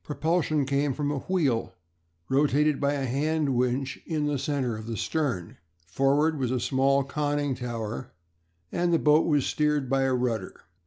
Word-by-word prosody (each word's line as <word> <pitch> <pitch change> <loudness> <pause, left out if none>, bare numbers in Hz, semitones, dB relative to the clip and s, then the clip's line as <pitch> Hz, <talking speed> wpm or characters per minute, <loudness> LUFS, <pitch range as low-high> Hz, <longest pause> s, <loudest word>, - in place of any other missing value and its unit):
Propulsion 155 -1 0
came 140 +1 0
from 145 -1 -1
a 145 - -2
wheel, 140 -10 0 0.5
rotated 145 +2 +2
by 140 0 +2
a 140 -2 -2
hand 145 +2 0
winch, 125 +2 -1
in 155 -2 -1
the 145 -2 -1
centre 130 -5 -1
of 110 +1 -8
the 115 -2 -4
stern; 125 - -2 0.3
forward 140 - +1
was 130 -3 0
a 130 0 0
small 135 +2 +2
conning 145 0 -1
tower, 115 - -5 0.6
and 175 0 0
the 165 - +4
boat 150 0 +4
was 145 -4 +2
steered 150 -4 0
by 135 0 +3
a 135 -1 +2
rudder. 115 -6 -2
140 Hz, 165 wpm, -27 LUFS, 125-150 Hz, 0.6 s, the